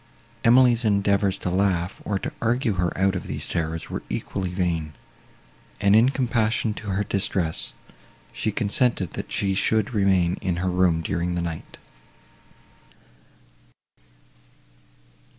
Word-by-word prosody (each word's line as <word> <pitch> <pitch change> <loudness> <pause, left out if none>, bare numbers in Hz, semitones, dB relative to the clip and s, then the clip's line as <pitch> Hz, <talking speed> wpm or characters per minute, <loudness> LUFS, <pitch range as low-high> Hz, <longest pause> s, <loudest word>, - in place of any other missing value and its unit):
Emily's 120 0 +5
endeavours 100 -2 +2
to 90 - -3
laugh, 90 -2 0
or 100 - -1
to - - -5
argue 120 0 +1
her 90 -2 0
out 95 +1 +2
of 90 - -4
these - - -4
terrors, 80 0 -3
were - - -3
equally 95 -2 -3
vain, 85 -4 -2 0.9
and, 100 +1 +4
in 115 +4 +6
compassion 115 -4 0
to 105 - -9
her 100 +1 0
distress, 95 -4 -1 0.6
she 110 - -1
consented 110 - 0
that - - -6
she 100 -1 0
should 110 +3 +1
remain 95 -4 +2
in 95 -3 -1
her 90 +1 -1
room 90 -3 +2
during 85 +3 -1
the 85 - -1
night. 80 -2 -6
95 Hz, 130 wpm, -24 LUFS, 90-110 Hz, 0.9 s, in